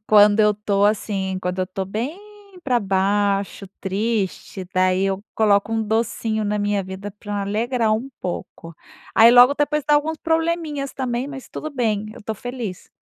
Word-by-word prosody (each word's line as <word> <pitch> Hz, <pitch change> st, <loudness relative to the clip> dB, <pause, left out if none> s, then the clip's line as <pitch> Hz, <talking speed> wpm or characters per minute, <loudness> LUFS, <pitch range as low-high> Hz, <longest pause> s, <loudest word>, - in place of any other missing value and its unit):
Quando 210 Hz, 0 st, +6 dB
eu 210 Hz, 0 st, +5 dB
estou 205 Hz, -1 st, 0 dB
assim, 195 Hz, -2 st, 0 dB
quando 180 Hz, 0 st, -3 dB
eu 185 Hz, -, +1 dB
estou 190 Hz, +1 st, -4 dB
bem 230 Hz, -, -4 dB, 0.4 s
pra 250 Hz, -5 st, +1 dB
baixo, 195 Hz, 0 st, 0 dB
triste, 195 Hz, -1 st, -2 dB
daí 185 Hz, +1 st, +2 dB
eu 195 Hz, 0 st, -1 dB
coloco 210 Hz, 0 st, +2 dB
um 225 Hz, 0 st, +1 dB
docinho 220 Hz, 0 st, -1 dB
na 210 Hz, 0 st, -1 dB
minha 205 Hz, -1 st, 0 dB
vida 190 Hz, +2 st, -7 dB
pra 205 Hz, 0 st, -5 dB
alegrar 220 Hz, +3 st, 0 dB
um 225 Hz, +5 st, -1 dB
pouco. 170 Hz, -2 st, -6 dB, 0.4 s
Aí 230 Hz, +1 st, +8 dB
logo 245 Hz, +3 st, +7 dB
depois 295 Hz, 0 st, 0 dB
dá 295 Hz, -, +4 dB
alguns 310 Hz, +2 st, +1 dB
probleminhas 325 Hz, -4 st, -1 dB
também, 255 Hz, 0 st, -2 dB
mas 275 Hz, -2 st, -9 dB
tudo 310 Hz, -, -6 dB
bem, 220 Hz, -6 st, -1 dB
eu -, -, -13 dB
tô 220 Hz, +1 st, -4 dB
feliz. 235 Hz, -4 st, -6 dB
210 Hz, 165 wpm, -22 LUFS, 195-245 Hz, 0.4 s, Aí